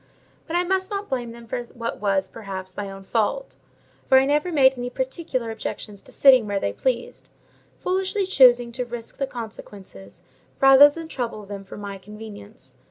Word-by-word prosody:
But 330 Hz, -, -3 dB
I 350 Hz, -, +3 dB
must 375 Hz, +1 st, 0 dB
not 405 Hz, 0 st, -4 dB
blame 245 Hz, -3 st, -2 dB
them 235 Hz, 0 st, -12 dB
for 235 Hz, +2 st, -3 dB
what 235 Hz, -1 st, -6 dB
was, 195 Hz, -2 st, +1 dB
perhaps, 190 Hz, -3 st, -8 dB
my 200 Hz, -1 st, -4 dB
own 195 Hz, 0 st, -10 dB
fault; 230 Hz, -, -1 dB, 0.5 s
for 265 Hz, -, +7 dB
I 265 Hz, -, +5 dB
never 295 Hz, +5 st, +1 dB
made 265 Hz, -4 st, +5 dB
any 245 Hz, 0 st, -4 dB
particular 260 Hz, -2 st, -3 dB
objections 210 Hz, -2 st, -6 dB
to -, -, -17 dB
sitting 260 Hz, -5 st, +6 dB
where 200 Hz, -1 st, -1 dB
they 100 Hz, -, -2 dB
pleased; 245 Hz, -, -3 dB, 0.5 s
foolishly 380 Hz, +2 st, -1 dB
choosing 245 Hz, -8 st, +5 dB
to 250 Hz, +2 st, -3 dB
risk 240 Hz, +1 st, -8 dB
the 275 Hz, -, 0 dB
consequences, 205 Hz, -, -10 dB, 0.4 s
rather 270 Hz, +2 st, +9 dB
than 325 Hz, +2 st, -8 dB
trouble 235 Hz, -8 st, -5 dB
them 200 Hz, 0 st, -7 dB
for 195 Hz, -, -11 dB
my 200 Hz, -1 st, -7 dB
convenience. 210 Hz, +2 st, -12 dB
240 Hz, 175 wpm, -23 LUFS, 205-275 Hz, 0.5 s, rather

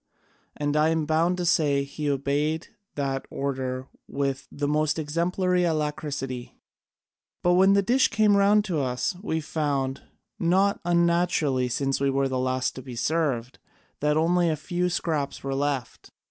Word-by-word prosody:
And 145 Hz, 0 st, -1 dB
I 155 Hz, +1 st, +4 dB
am 160 Hz, -1 st, 0 dB
bound 165 Hz, +4 st, +1 dB
to 180 Hz, -, -2 dB
say 145 Hz, -5 st, +2 dB
he 145 Hz, +1 st, -4 dB
obeyed 145 Hz, +4 st, -1 dB, 0.3 s
that 135 Hz, -2 st, -2 dB
order 130 Hz, -2 st, -3 dB, 0.2 s
with 140 Hz, 0 st, -2 dB
the 145 Hz, 0 st, -2 dB
most 150 Hz, +1 st, +1 dB
exemplary 180 Hz, +4 st, 0 dB
alacrity. 150 Hz, -6 st, -3 dB, 0.9 s
But 175 Hz, -, +4 dB
when 190 Hz, +2 st, +5 dB
the 200 Hz, 0 st, +3 dB
dish 250 Hz, +6 st, +3 dB
came 215 Hz, -2 st, +3 dB
round 205 Hz, +1 st, +4 dB
to 175 Hz, -7 st, -1 dB
us, 130 Hz, +6 st, -1 dB
we 160 Hz, -6 st, -2 dB
found, 140 Hz, -4 st, -2 dB, 0.4 s
not 190 Hz, +4 st, +2 dB
unnaturally, 170 Hz, -7 st, +2 dB
since 135 Hz, +2 st, 0 dB
we 140 Hz, -, +2 dB
were 135 Hz, 0 st, +1 dB
the 130 Hz, -1 st, -2 dB
last 130 Hz, 0 st, 0 dB
to -, -, -5 dB
be 125 Hz, -1 st, -9 dB
served, 130 Hz, -2 st, -1 dB, 0.4 s
that 150 Hz, +1 st, +1 dB
only 170 Hz, +2 st, +3 dB
a 155 Hz, -, +1 dB
few 175 Hz, +4 st, -2 dB
scraps 155 Hz, -5 st, -2 dB
were 135 Hz, 0 st, -2 dB
left. 135 Hz, -3 st, -3 dB
150 Hz, 155 wpm, -26 LUFS, 135-175 Hz, 0.9 s, when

